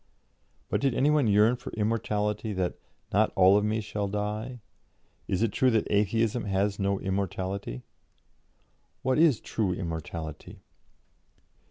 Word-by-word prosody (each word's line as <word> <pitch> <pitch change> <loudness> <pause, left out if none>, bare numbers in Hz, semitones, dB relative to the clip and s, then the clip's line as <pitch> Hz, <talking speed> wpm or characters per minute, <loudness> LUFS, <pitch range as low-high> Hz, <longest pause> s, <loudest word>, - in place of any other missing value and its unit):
'" - - -40
But - - +1
did 135 -3 +1
any 145 +3 +3
one 150 -5 +3
yearn 105 +4 +4
for - - -8
immortality, 105 -1 -1
that 90 -2 -1 0.4
"not - - +3
all 95 +1 +6
of 105 - +3
me 110 +1 0
shall 105 -1 -3
die"? 105 +5 -3 0.7
"Is 95 +4 0
it 115 - +1
true 130 - +3
that 110 -3 +2
Atheism 110 +3 +1
has 100 +1 0
no 100 0 0
immortality? 95 -7 -3 1.2
What 130 +2 +2
is 155 -8 +5
true 100 -5 -1
immortality? 80 -3 -6
105 Hz, 140 wpm, -28 LUFS, 95-115 Hz, 1.2 s, all